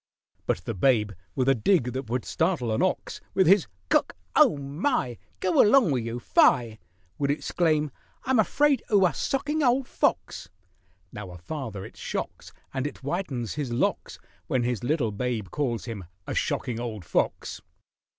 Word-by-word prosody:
But 85 - -1
the 115 - -2
babe, 105 0 +2 0.2
with 130 - +1
a 135 - +6
dig 125 - +2
that 130 -3 -5
would 125 +1 -1
startle 160 -9 0
an 110 - 0
ox, 185 - -1
With 190 - +4
his 180 -5 +5 0.2
"C'ck! - - +2 0.2
Oh, - - +6
my!— 140 - -1 0.2
Go 185 - +4
along 215 - +5
wiz 120 -4 -1
'oo, 115 +1 -4
fie!" 115 -2 +3 0.4
Would 140 -1 0
exclaim, 155 0 +1 0.3
"I'm 260 -2 +2
afraid 280 +6 +3
'oo 200 -3 +5
a 175 - +2
socking 290 - -1
ole 260 0 +3
fox." 165 - -1 0.6
Now 105 -2 -7
a 90 - -9
father 105 - -6
it - - -13
shocks, - - -5 0.2
And 135 +1 -1
it 145 - -8
whitens 140 - -3
his 145 -5 -3
locks, 120 - -1 0.3
When 125 -2 +1
his 120 -3 -1
little 125 -4 +1
babe 110 -2 -3
calls 125 -6 -2
him 110 -6 -6 0.2
a - - -4
shocking 120 -2 -1
old 110 -6 -5
fox. - - -1
130 Hz, 165 wpm, -26 LUFS, 115-175 Hz, 0.6 s, a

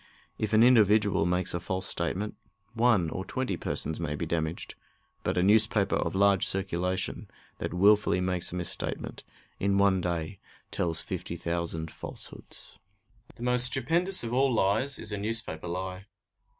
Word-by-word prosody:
If 110 -1 -2
an 110 +1 +5
individual 105 -7 +4
makes 90 0 -1
a 85 - -2
false 95 +2 -4
statement, 95 +4 -3 0.4
one 115 -8 +2
or 95 - -4
twenty 130 -3 -3
persons 80 -2 -4
may 75 -3 -3
be 85 - -4
damaged; 80 0 -4 0.5
but - - -2
a 90 - +2
newspaper 105 0 +2
of - - -3
large 100 -1 +3
circulation 90 0 -3 0.3
that - - -4
wilfully 100 0 +3
makes 90 -1 -2
a - - -6
misstatement 90 -1 -4 0.4
in 100 0 +1
one 100 -2 +3
day 85 +2 -4 0.3
tells 80 -2 -2
fifty - - -6
thousand 85 -1 -4
falsehoods. - - -11 0.6
The 120 - -10
most 125 0 +6
stupendous 165 +9 +5
of 115 0 -4
all 135 +1 +2
lies 115 +5 +2
is - - -2
a 105 - -3
newspaper 105 -6 -1
lie. 95 +2 -6
95 Hz, 150 wpm, -28 LUFS, 85-110 Hz, 0.6 s, most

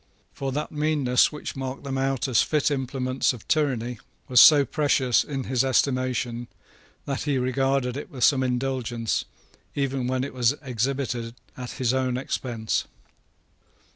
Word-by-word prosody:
For 135 -1 -4
that 150 +2 -3
meanness 150 -4 +2
which 150 - -6
marked 135 0 -5
them 135 -1 -4
out 135 -1 0
as 125 -4 +3
fit 150 -1 +1
implements 130 -1 0
of 120 - -12
tyranny 125 -6 0 0.3
was 125 -1 +7
so 145 -3 +8
precious 135 -5 +2
in 135 -3 -4
his 130 0 +1
estimation 130 -2 0 0.6
that 140 -1 -3
he 145 -3 +1
regarded 130 0 0
it 145 - -6
with 130 -3 -4
some 135 0 +5
indulgence 125 -3 -1 0.5
even 135 -3 -1
when 130 0 0
it 140 - -5
was 125 +1 +2
exhibited 125 -2 -2 0.2
at 125 -2 -7
his 125 -1 0
own 130 -1 0
expense. 120 -4 -2
130 Hz, 145 wpm, -25 LUFS, 125-140 Hz, 0.6 s, so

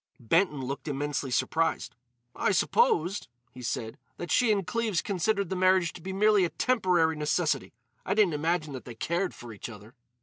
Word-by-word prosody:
Benton 150 - +1
looked 140 +3 -5
immensely 145 -1 -2
surprised. 160 +6 0 0.4
"I - - +1
supposed," 440 - +2 0.2
he 125 - -11
said, 115 -2 -4 0.2
"that 175 - -6
she 245 -3 +4
and 200 -3 +1
Cleves 215 0 0
considered 200 0 0
the - - 0
marriage 185 -1 +3
to 180 - -11
be 190 - -5
merely 205 0 +4
a 175 - +1
temporary 180 -11 +2
necessity. 150 -2 0 0.3
I 195 - -1
didn't 205 -6 +4
imagine 155 0 -1
that 130 - -7
they 120 - -9
cared 170 +10 -1
for 120 -1 -10
each 105 - -8
other." 105 +1 -12
170 Hz, 175 wpm, -28 LUFS, 145-195 Hz, 0.4 s, she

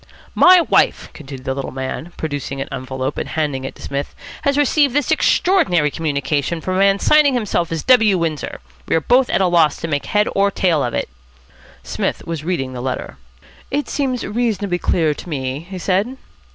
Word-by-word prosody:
"My 365 -1 +7
wife," - - +1
continued 135 -3 -10
the 130 - -1
little 135 0 -4
man, 130 +6 -5
producing 145 -3 -4
an 135 - -3
envelope 130 +1 -4
and - - -4
handing 145 -4 -2
it - - -6
to - - -13
Psmith, 140 +1 -4 0.3
"has 280 0 +1
received 290 -1 +3
this 290 -2 +1
extraordinary 185 - +2
communication 150 +1 -1
from 185 +3 -2
a - - +1
man 195 0 +4
signing 290 +4 +4
himself 200 -7 -1
W. 210 +4 +3
Windsor. 160 - -3 0.3
We - - +1
are - - +4
both 245 - +3
at 190 - +1
a - - +4
loss 170 -4 +3
to - - -3
make 145 -3 -2
head 210 0 +2
or 200 0 +3
tail 175 -6 +1
of 120 - -2
it." - - -1 0.8
Psmith - - -3
was 165 -3 -4
reading 155 -7 -2
the 125 - -5
letter. 130 - -4 0.5
"It 290 +1 -1
seems 260 -4 -1
reasonably 210 -4 -1
clear 160 -4 +1
to 175 - -10
me," 135 -3 -3
he 190 - -6
said. 195 +8 -1
170 Hz, 190 wpm, -19 LUFS, 140-215 Hz, 0.8 s, My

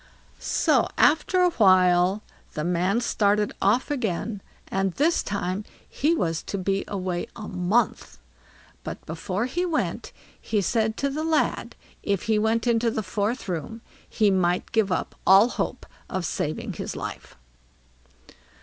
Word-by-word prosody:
So - - +2
after 345 +4 +3
a 360 -1 +4
while 185 - +4 0.3
the 150 - -2
man 180 +6 +1
started 210 -2 +1
off 225 +8 +2
again, 215 -5 -2 0.3
and 195 -1 -1
this 315 - +2
time 200 0 -3 0.2
he 315 +4 +1
was 165 - -1
to 200 - -5
be 195 +1 -1
away 185 0 -3
a 215 -2 -7
month. 185 - 0 0.7
But - - -7
before 185 +6 -3
he 335 +8 -2
went, 335 -4 -2 0.3
he 215 - 0
said 220 +3 0
to 280 - 0
the 305 +3 -3
lad, 320 -1 0 0.3
if 200 -3 -1
he 220 -1 +1
went 220 +2 +1
into 235 -1 +2
the 220 -1 -2
fourth 215 +4 -2
room 190 +6 -4 0.3
he 210 -3 +2
might 180 -1 +1
give 220 -4 +1
up - - -1
all 195 +5 +7
hope - - -3 0.2
of 185 -2 -2
saving 155 -1 -3
his - - -5
life. - - -7
205 Hz, 145 wpm, -25 LUFS, 185-235 Hz, 0.7 s, all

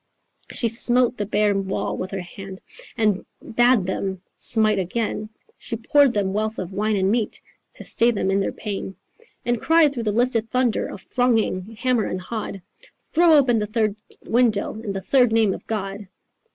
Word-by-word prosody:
She 235 - +1
smote 240 +2 +4
the 205 - -3
bare 210 0 +2
wall 195 0 -2
with 185 - -4
her 195 -1 -4
hand 190 +2 -10 0.4
And 210 -4 +1 0.2
bad 240 -3 +2
them 190 0 -3
smite 215 -3 +2
again; 215 +3 -2 0.3
She 230 - -2
poured 255 +3 +3
them 195 -2 0
wealth 215 +2 -2
of 185 0 -5
wine 210 +2 0
and 190 0 +1
meat 230 -1 -1 0.3
To - - -9
stay 235 - +3
them 200 -4 0
in 195 - +2
their 195 - -1
pain. 195 -2 -5 0.5
And 240 -1 0
cried 325 -3 +4
through 245 - -3
the - - +1
lifted 230 0 0
thunder 250 -2 +1
Of 190 - -9
thronging 225 -4 0
hammer 250 -2 +1
and 185 - -3
hod 195 -1 -6 0.4
'Throw 335 0 +3
open 250 -6 +4
the 210 - -2
third 215 -1 0 0.3
window 230 -3 +1
In 205 -3 -4
the 195 - -4
third 250 +3 +3
name 220 -3 +3
of - - -10
God. 200 -2 -4
215 Hz, 180 wpm, -23 LUFS, 195-240 Hz, 0.5 s, smote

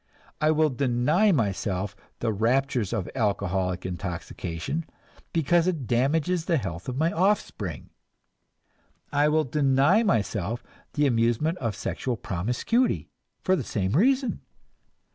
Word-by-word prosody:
I 155 - +4
will 155 -1 +3
deny 140 - +2
myself 100 - -1 0.3
the 115 -2 0
raptures 120 0 +1
of 105 -6 -2
alcoholic 95 -5 -1
intoxication, 90 - -4 0.4
because 170 +2 +2
it 160 -8 -1
damages 155 +8 +1
the 170 -3 +2
health 90 - -5
of 130 - -4
my 160 +3 +2
offspring; 165 - -1 1.2
I 145 +1 +3
will 155 +1 +3
deny 140 - +3
myself 115 - 0 0.3
the 145 - +2
amusement 120 +7 +1
of 115 -5 -2
sexual 120 +5 -3
promiscuity 120 - 0 0.3
for 185 - +3
the 145 - -2
same 95 -4 -2
reason. 255 - +2
130 Hz, 120 wpm, -26 LUFS, 100-160 Hz, 1.2 s, I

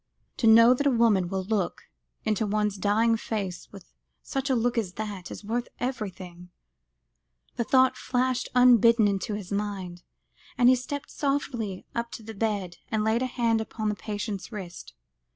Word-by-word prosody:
"To 230 - +2
know 230 +2 +8
that 285 +3 0
a - - +6
woman 225 -8 +3
will 190 0 -2
look 200 -2 -2 0.4
into 215 0 0
one's 210 0 0
dying 220 +4 +2
face 200 -5 -5
with 195 -3 -14 0.3
such 270 0 -3
a 260 - +3
look 240 +1 +1
as 210 -6 -1
that, 205 -3 -6
is - - -8
worth 235 +3 -2
everything," 185 -8 -5 1.1
the 235 - 0
thought 260 +2 +4
flashed 255 0 -1
unbidden 235 -3 +6
into 200 +1 -1
his 205 -2 -7
mind, 195 -4 -4 0.6
as 245 -2 +5
he 255 - +7
stepped 280 +3 -6
softly 245 -9 -2
up 235 0 -2
to 225 - -8
the 220 +1 -8
bed, 200 -4 -2
and 220 -1 0
laid 220 +2 +1
a 255 - 0
hand 230 -3 +1
upon 215 -1 -3
the 210 - -1
patient's 205 -1 -5
wrist. 180 - -8
220 Hz, 170 wpm, -27 LUFS, 200-240 Hz, 1.1 s, know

